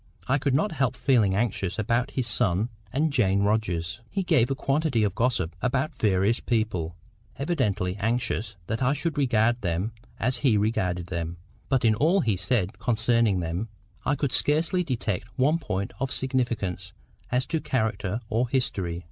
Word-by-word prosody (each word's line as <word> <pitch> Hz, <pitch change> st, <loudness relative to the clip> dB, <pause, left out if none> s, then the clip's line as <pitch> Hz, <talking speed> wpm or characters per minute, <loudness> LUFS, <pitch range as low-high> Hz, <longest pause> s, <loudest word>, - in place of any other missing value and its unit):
—I 135 Hz, +2 st, +2 dB
could 135 Hz, -1 st, +1 dB
not 175 Hz, +8 st, +1 dB
help 135 Hz, -7 st, 0 dB
feeling 110 Hz, -8 st, +3 dB
anxious 100 Hz, -4 st, -1 dB
about 115 Hz, +4 st, +1 dB
his 130 Hz, -, +1 dB
son 110 Hz, -2 st, +1 dB, 0.2 s
and 150 Hz, +2 st, +1 dB
Jane 100 Hz, -6 st, +3 dB
Rogers.—He 105 Hz, -, -1 dB
gave 125 Hz, -9 st, +3 dB
a 135 Hz, -, 0 dB
quantity 135 Hz, -4 st, +1 dB
of 100 Hz, -3 st, +1 dB
gossip 95 Hz, -8 st, 0 dB
about 135 Hz, +5 st, 0 dB
various 105 Hz, -2 st, +2 dB
people, 105 Hz, -8 st, -1 dB, 0.4 s
evidently 115 Hz, -, 0 dB
anxious 110 Hz, 0 st, -1 dB
that 110 Hz, +6 st, -3 dB
I 130 Hz, +2 st, +3 dB
should 155 Hz, +2 st, -2 dB
regard 120 Hz, -3 st, +2 dB
them 90 Hz, +3 st, -1 dB, 0.3 s
as 125 Hz, +2 st, +1 dB
he 120 Hz, -4 st, +3 dB
regarded 90 Hz, -5 st, 0 dB
them; 85 Hz, -2 st, -4 dB, 0.3 s
but 130 Hz, -3 st, +2 dB
in 110 Hz, -, +5 dB
all 160 Hz, -, +3 dB
he 110 Hz, -4 st, +1 dB
said 95 Hz, +1 st, -1 dB
concerning 115 Hz, -4 st, +2 dB
them 85 Hz, +7 st, -3 dB, 0.3 s
I 145 Hz, -, +1 dB
could 140 Hz, -2 st, -1 dB
scarcely 165 Hz, +5 st, +2 dB
detect 115 Hz, -, -2 dB
one 150 Hz, +5 st, +3 dB
point 95 Hz, -, -3 dB
of 135 Hz, 0 st, -1 dB
significance 120 Hz, -8 st, -1 dB, 0.4 s
as 125 Hz, +2 st, +1 dB
to 160 Hz, -2 st, -1 dB
character 110 Hz, -3 st, -1 dB
or 115 Hz, +2 st, 0 dB
history. 95 Hz, -10 st, -1 dB
115 Hz, 160 wpm, -26 LUFS, 100-130 Hz, 0.4 s, in